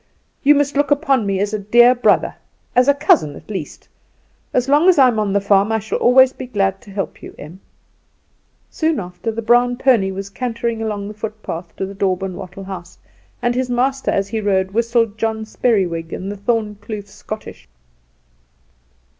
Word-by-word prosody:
"You 295 +1 +5
must 285 0 0
look 285 -1 +2
upon 270 -6 +2
me 195 -1 0
as 205 +1 -1
a 215 - -1
dear 240 +5 +5
brother, 245 - +2 0.4
as 250 +1 +4
a 285 - +6
cousin 170 - +2
at - - -12
least; 185 -7 -6 0.6
as 250 0 0
long 295 +6 +5
as 365 - +5
I 265 -2 +7
am 220 -3 -1
on 210 -2 0
the 200 - +2
farm 200 +1 +2
I 225 - +2
shall 220 0 -3
always 260 +1 +5
be 255 - -8
glad 195 -4 -1
to 230 - -16
help 195 -1 -5
you, - - -11
Em." 160 +6 -11 1.1
Soon 320 -3 0
after 180 +4 -5
the 230 +1 -5
brown 245 +2 +3
pony 245 -7 +3
was 195 +1 -6
cantering 235 0 -3
along 210 -2 -3
the 210 - -7
footpath 210 -6 -7
to 190 - -3
the 195 - -8
daub 190 -1 -1
and 190 -2 -4
wattle 190 +1 -9
house, 185 -2 -9 0.5
and 240 0 +2
his 255 +1 -1
master 265 +2 0
as 195 0 0
he 220 -1 -2
rode 190 -2 0
whistled 230 -1 0
John 220 -1 -1
Speriwig 180 -8 0
and 195 +2 -5
the 205 - -7
Thorn 210 0 -1
Kloof 205 -1 -6
Schottische. 215 +1 -9
215 Hz, 190 wpm, -19 LUFS, 195-245 Hz, 1.1 s, I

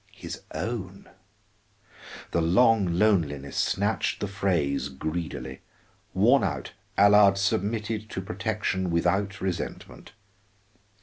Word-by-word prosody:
'" - - -32
His - - -6
own! 100 -4 -5 1.2
The 85 - +1
long 100 +4 +4
loneliness 80 -9 +1
snatched 100 +3 0
the 105 - -2
phrase 95 -8 0
greedily; 80 +5 -5 0.5
worn 115 +6 +4
out, 70 -9 -3 0.3
Allard 100 -1 +6
submitted 110 +2 -1
to - - -4
protection 95 -1 -2
without 95 +4 0
resentment. 95 -2 -5
100 Hz, 100 wpm, -26 LUFS, 85-105 Hz, 1.2 s, Allard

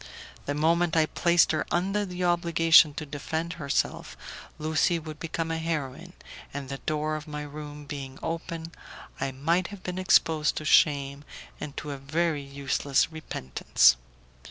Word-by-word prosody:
The 145 - -1
moment 165 +2 +2
I 160 - +5
placed 170 +2 +3
her 155 -2 0
under 195 +4 0
the 180 0 -4
obligation 165 -3 +5
to 155 - -4
defend 160 +3 -4
herself 140 -1 -1 0.4
Lucie 160 +2 +1
would 155 -2 -8
become 165 0 -3
a 165 - -1
heroine, 155 -5 -4 0.4
and 140 -1 -6
the 135 0 -5
door 155 0 -1
of 155 +1 -7
my 150 0 -5
room 150 0 -8
being 135 -2 -7
open, 165 0 -4 0.5
I 135 0 -1
might 165 +7 0
have 205 -2 -11
been 180 0 -4
exposed 160 -4 +3
to 155 - -4
shame 140 -2 +3 0.4
and 145 0 -7
to 150 - -4
a 140 - -6
very 155 +2 0
useless 140 +1 0
repentance. 65 - +2
155 Hz, 155 wpm, -27 LUFS, 145-165 Hz, 0.5 s, I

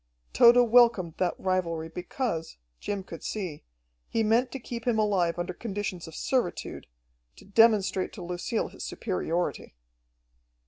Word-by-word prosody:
Tode 235 +1 +7
welcomed 230 -8 +4
that 180 -2 0
rivalry 170 -4 -1
because, 175 - -4 0.2
Jim 200 -2 -3
could 165 -3 -10
see, 185 -8 -4 0.5
he 225 - +1
meant 230 +4 +2
to 270 - -5
keep 235 0 -7
him 235 -2 +2
alive 190 -6 +1
under 175 +1 -3
conditions 195 -4 -5
of 160 - -10
servitude, 250 -9 -2 0.5
to - - -16
demonstrate 200 -3 +3
to 185 - -8
Lucille 180 +5 -2
his - - -10
superiority. 175 - -3
195 Hz, 135 wpm, -28 LUFS, 175-225 Hz, 0.5 s, Tode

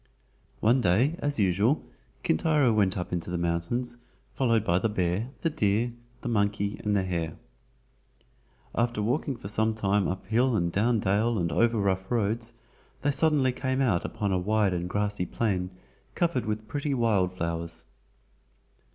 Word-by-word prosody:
One 120 +4 +4
day, 110 - +3
as 145 0 -1
usual, 100 - +2 0.4
Kintaro 145 - +3
went 100 -2 +2
up 90 0 -4
into 85 -1 -2
the 90 - -2
mountains, 85 +9 -2 0.3
followed 115 -5 +2
by 85 +1 +3
the 110 - 0
bear, 95 +3 -1
the 165 - +1
deer, 110 0 +1 0.3
the - - -5
monkey, 100 -2 0
and 105 -1 +1
the 100 - +2
hare. 85 -4 -3 1.4
After 120 -1 0
walking 130 +6 0
for 100 - -8
some 110 +2 0
time 100 -2 +1
up 95 +1 -4
hill 120 +4 +2
and 85 -3 +1
down 110 +4 +2
dale 105 +4 +1
and 85 -3 0
over 115 0 +2
rough 95 -2 0
roads, 115 0 -1 0.5
they 145 - +3
suddenly 140 -2 +3
came 130 +1 -2
out 110 -11 +2
upon 105 -3 -2
a 95 - +2
wide 105 0 +2
and 90 0 -2
grassy 105 -2 -1
plain 95 -5 -1 0.5
covered 165 -10 0
with 110 0 -3
pretty 140 +4 -2
wild 100 -7 +1
flowers. 85 -1 -3
105 Hz, 160 wpm, -27 LUFS, 95-120 Hz, 1.4 s, One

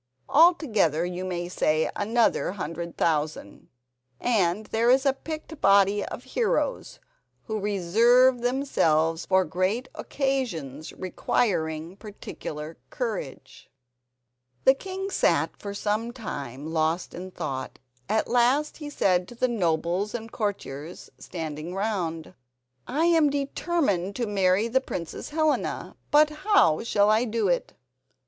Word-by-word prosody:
Altogether 260 - +4
you 180 +1 -4
may 175 -2 -3
say 155 -3 +1
another 225 -3 +1
hundred 170 -2 -5
thousand, 150 -9 -1 0.5
and 210 -3 +1
there 230 +3 +1
is 265 +2 +4
a 275 - +4
picked 310 +2 -8
body 200 +1 +4
of - - -7
heroes - - -1 0.4
who 220 -2 -3
reserve 230 +6 +4
themselves 165 - +1
for 190 -1 +3
great 185 +10 -1
occasions 190 - -3
requiring 170 -3 -1
particular 160 -7 -8
courage." 220 - -5 0.9
The 265 - +7
king 385 +6 -6
sat - - +2
for 200 -1 -6
some 215 +3 -1
time 150 - -6
lost 160 +2 0
in 185 +2 -7
thought. 140 -7 -5 0.3
At 215 +1 +1
last 250 +5 +2
he 295 -2 -7
said 185 -10 +1
to 240 - -11
the 255 +2 +1
nobles 180 -1 0
and 225 -1 -6
courtiers 175 - -5
standing 160 0 -6
round: 185 -6 -2 0.5
"I 310 +5 +1
am 325 -3 +4
determined 275 - -1
to 240 - -1
marry 195 0 +2
the 260 +3 +2
Princess 170 -10 -6
Helena, 310 0 -1
but 300 +1 +5
how 305 - +3
shall 210 -2 +3
I 220 +2 +3
do 225 -2 0
it?" 175 - -1
205 Hz, 125 wpm, -26 LUFS, 170-255 Hz, 0.9 s, The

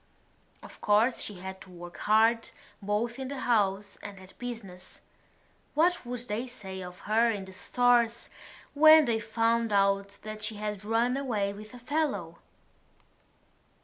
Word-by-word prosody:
Of - - -13
course 215 +4 +3
she 205 - -4
had 190 +1 -8
to - - -12
work 175 -1 -10
hard, 225 +2 +3 0.3
both 215 +5 -1
in 265 - -4
the 275 0 -5
house 200 -4 0
and 200 -1 -9
at 190 0 -13
business. 210 -7 -8 0.7
What 335 -3 +2
would 245 -1 -4
they 220 +5 -3
say 190 -6 -8
of 180 0 -9
her 225 +2 +3
in 205 -4 -3
the 190 - -12
Stores 235 +3 +2 0.5
when 310 +1 +8
they 230 -2 +1
found 230 +1 +1
out 200 0 +2
that 215 0 -7
she 215 0 -3
had 210 -1 -4
run 230 +4 +1
away 215 -8 -1
with 215 +3 -11
a - - -10
fellow? 240 - -2
215 Hz, 150 wpm, -29 LUFS, 200-240 Hz, 0.7 s, when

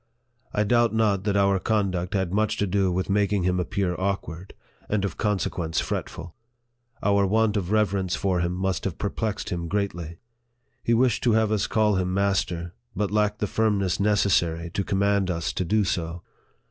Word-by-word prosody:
I 105 - +1
doubt 120 +1 +2
not 105 -3 +1
that 100 -1 +1
our 100 -1 +3
conduct 95 -3 -1
had 95 -2 -1
much 110 +1 +1
to 105 - +1
do 95 -1 +1
with 90 +1 -1
making 100 -1 +1
him 90 0 +1
appear 95 0 -1
awkward, 95 -2 -3 0.3
and 105 -2 0
of 100 - -4
consequence 90 -5 -1
fretful. 85 0 -4 0.7
Our 100 -1 +3
want 110 +1 +2
of 95 -4 -1
reverence 100 -4 +1
for 95 -2 0
him 85 0 0
must 95 -1 -1
have 95 -4 -3
perplexed 105 0 -3
him 85 -2 -3
greatly. 85 -4 -3 0.6
He 115 - +2
wished 125 -1 +2
to 120 - +4
have 110 -1 +2
us 105 -2 +1
call 105 -3 +2
him 90 0 -1
master, 90 -3 0 0.2
but 105 -1 -1
lacked 105 0 +1
the - - +2
firmness 100 -4 0
necessary 90 -5 +1
to 100 - -1
command 100 0 +1
us 85 -2 -2
to - - -1
do 105 +4 +2
so. 85 -3 -3
100 Hz, 175 wpm, -25 LUFS, 90-105 Hz, 0.7 s, to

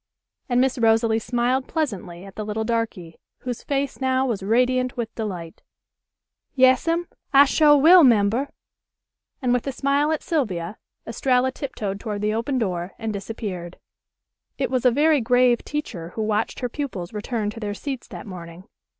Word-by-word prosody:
and 245 0 +2
Miss 260 0 +1
Rosalie 225 0 +3
smiled 245 +3 0
pleasantly 195 - -3
at 195 - -11
the 215 - -5
little 215 +1 -3
darky, 220 -8 -3 0.2
whose 245 -2 -5
face 275 -1 -2
now 260 0 +2
was 230 -7 -2
radiant 250 +5 +1
with 235 -1 -3
delight. 180 -7 -6 0.9
"Yas'm. 275 +7 +3 0.3
I 280 +1 +8
sho' 295 +1 +5
will 335 +5 +8
'member," 235 +2 +3 0.9
and 245 -1 +2
with 250 +2 -1
a - - 0
smile 280 +3 +1
at 315 - -2
Sylvia, 210 - -2 0.3
Estralla 250 +2 +1
tiptoed 210 -8 -5
toward 210 -1 -4
the 210 0 +1
open 235 +5 -1
door 180 -5 -2
and 225 -2 -3
disappeared. 195 -4 -6 0.8
It - - -1
was 255 -1 0
a - - +8
very 295 +2 +3
grave 245 0 +3
teacher 215 - -5
who 220 - -1
watched 215 +3 -1
her 250 - 0
pupils 240 - -5
return 210 0 -2
to 225 - -9
their 205 -2 -4
seats 270 -1 -5
that - - -9
morning. 175 -2 -9
235 Hz, 160 wpm, -23 LUFS, 210-265 Hz, 0.9 s, I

